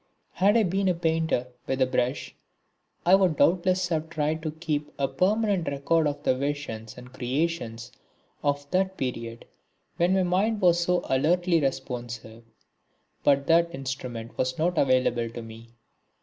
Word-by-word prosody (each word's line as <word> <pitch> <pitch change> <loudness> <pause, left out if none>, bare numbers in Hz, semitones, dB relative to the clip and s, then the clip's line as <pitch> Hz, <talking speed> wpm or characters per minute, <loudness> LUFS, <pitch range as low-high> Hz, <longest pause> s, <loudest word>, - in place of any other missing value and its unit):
Had 200 +5 +3
I 225 - +4
been 195 +1 0
a 180 - +2
painter 160 -6 0 0.2
with 135 - 0
the 130 - +3
brush 125 +1 -1 0.7
I 180 - +5
would 185 -5 +4
doubtless 180 +1 +2
have 160 -1 -1
tried 155 0 -1
to 155 - -3
keep 150 -2 -3
a 140 -1 +1
permanent 195 +4 +1
record 140 +3 +1
of 145 0 -4
the 130 - +2
visions 130 -5 -4
and 125 +1 -12
creations 130 -3 -2 0.5
of 145 0 0
that 190 +1 0
period 115 -3 -4 0.5
when 175 +2 +3
my 190 - +3
mind 195 +5 +1
was 175 -3 +4
so 180 +1 +1
alertly 170 +5 +2
responsive. 120 -4 -4 0.8
But 140 -1 +3
that 170 +1 +3
instrument 125 -3 -6
was 130 0 0
not 170 +2 +1
available 125 -3 +2
to 120 +1 -7
me. 115 +1 -12
150 Hz, 150 wpm, -26 LUFS, 130-175 Hz, 0.8 s, I